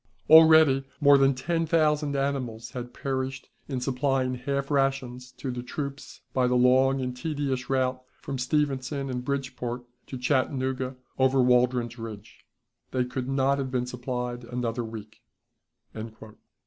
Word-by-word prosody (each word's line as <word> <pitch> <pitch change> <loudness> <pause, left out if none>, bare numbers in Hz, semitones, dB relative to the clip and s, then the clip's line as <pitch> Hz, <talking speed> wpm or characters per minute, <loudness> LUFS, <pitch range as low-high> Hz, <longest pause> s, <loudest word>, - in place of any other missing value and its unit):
Already 160 -4 +8 0.2
more 145 -1 +7
than 135 0 +4
ten 165 +5 -1
thousand 150 -2 +2
animals 130 -5 -2
had 125 -2 -6
perished 130 0 -4 0.2
in 135 -3 -3
supplying 130 0 0
half 140 +3 -3
rations 135 -3 -1
to 130 - -5
the 125 0 -4
troops 140 +2 -6
by 130 -1 +2
the 125 - +1
long 130 +2 +4
and 125 -1 -3
tedious 135 -2 -3
route 130 -1 0 0.2
from 135 -2 -5
Stevenson 135 0 -1
and 125 -1 -3
Bridgeport 125 -3 -3 0.2
to 130 - -6
Chattanooga 130 0 0 0.2
over 130 0 +3
Waldron's 125 -1 +2
Ridge. 110 0 -9 0.4
They 125 -1 0
could 125 +1 -4
not 135 +1 +2
have 135 -1 -2
been 125 -1 -1
supplied 125 0 -4
another 120 0 -3
week." 110 -1 -9
130 Hz, 135 wpm, -27 LUFS, 125-140 Hz, 0.4 s, Already